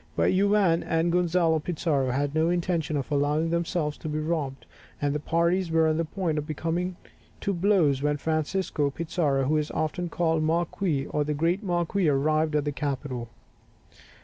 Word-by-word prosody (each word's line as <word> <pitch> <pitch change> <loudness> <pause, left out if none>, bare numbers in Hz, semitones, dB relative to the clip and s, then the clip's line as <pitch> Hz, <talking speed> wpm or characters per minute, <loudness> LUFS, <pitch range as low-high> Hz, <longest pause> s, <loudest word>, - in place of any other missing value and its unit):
But - - +2
Juan 195 -3 +3
and 165 +1 0
Gonzalo 170 -2 +2
Pizarro 150 -5 -1
had 140 +3 -1
no 160 +1 +2
intention 170 -3 0
of 140 +1 -4
allowing 150 +3 +1
themselves 170 -3 -1
to 155 - -5
be 150 - -2
robbed, 155 -4 -2 0.3
and 145 -1 0
the 150 - -1
parties 170 +3 +1
were 160 0 +3
on 155 0 +1
the 165 - 0
point 160 -2 -2
of 150 - -6
coming 175 +4 -2 0.5
to 200 - 0
blows 170 -7 +2
when 145 0 +1
Francisco 155 0 -1
Pizarro, 155 -3 0
who 150 +4 +2
is 150 0 -1
often 175 +3 -2
called 165 -2 +1
the 155 - +1
Marquis 165 -3 0
or 150 - -1
the 150 0 -2
great 170 +6 +1
Marquis, 175 -1 0
arrived 155 +2 +1
at 150 -1 +1
the 145 - 0
capital. 135 -4 -4
160 Hz, 175 wpm, -26 LUFS, 150-175 Hz, 0.5 s, Juan